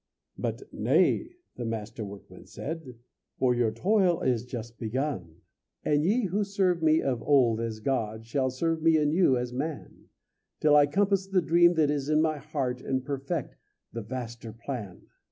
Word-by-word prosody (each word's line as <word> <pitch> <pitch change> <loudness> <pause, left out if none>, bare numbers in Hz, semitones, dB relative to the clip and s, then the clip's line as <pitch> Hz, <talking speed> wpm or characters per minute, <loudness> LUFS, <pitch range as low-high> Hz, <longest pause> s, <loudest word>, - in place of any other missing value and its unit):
But - - -3
"Nay," - - +2 0.3
the 120 - -4
Master 115 -1 -4
Workman 100 -1 -11
said, 155 -5 -6 0.4
"For 130 -2 +3
your 120 -2 +2
toil 180 - +2
is 125 -2 0
just 120 -2 -7
begun. 110 - -3 0.4
"And 150 0 +2
ye 220 +8 +2
who 200 +2 0
served 190 -4 +1
me 160 0 +4
of 125 -4 -1
old 125 -6 +3
as 115 -2 -3
God 110 -3 -2
Shall 130 +2 0
serve 160 +5 -1
me 165 0 +5
anew 150 -2 +3
as 125 0 -3
man, 145 +3 -5 0.5
Till 150 -1 +4
I 145 -1 +6
compass 195 +3 +1
the 195 -1 +2
dream 175 +2 +4
that 155 -2 +3
is 145 -1 -2
in 155 0 +3
my 155 -1 +1
heart, 135 -4 -3
And 130 -1 -2
perfect 140 +2 -3 0.4
the 115 - -4
vaster 120 0 -6
plan." 115 -4 -7
140 Hz, 165 wpm, -28 LUFS, 120-160 Hz, 0.5 s, I